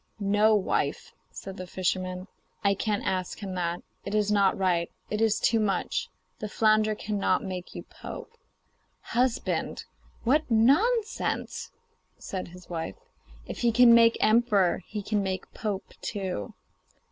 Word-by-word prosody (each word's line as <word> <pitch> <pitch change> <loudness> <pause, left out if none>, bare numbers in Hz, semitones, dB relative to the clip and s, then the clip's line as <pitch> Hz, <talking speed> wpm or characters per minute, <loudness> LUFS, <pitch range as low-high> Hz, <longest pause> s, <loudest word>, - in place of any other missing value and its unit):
'No, 205 +2 +4
wife,' 200 - -1 0.2
said 195 0 -8
the 185 - -6
fisherman; 185 0 -2 0.4
'I 200 -1 +4
can't 205 +1 -1
ask 185 -1 -1
him 195 -3 -6
that. 175 -1 -2 0.2
It 200 - -3
is 210 -1 +2
not 200 -2 +3
right; 175 -3 +1 0.2
it 210 +1 -1
is 225 -2 +3
too 225 - +3
much. 210 -2 -1 0.3
The 215 - -4
flounder 215 0 +3
cannot 205 -1 0
make 185 -2 -6
you - - -6
pope.' 460 - -10 0.7
'Husband, 245 0 -1 0.4
what 290 +6 +2
nonsense!' 350 - +2 0.5
said 185 -2 -5
his 180 +1 -13
wife. 165 -2 -4 0.5
'If - - -7
he 240 -1 +3
can 240 +1 +7
make 230 0 +6
emperor, 215 -5 +3
he 210 -1 -5
can 210 0 0
make, 190 -1 -4
pope 205 -3 -4
too. 190 - -4
205 Hz, 140 wpm, -27 LUFS, 185-225 Hz, 0.7 s, can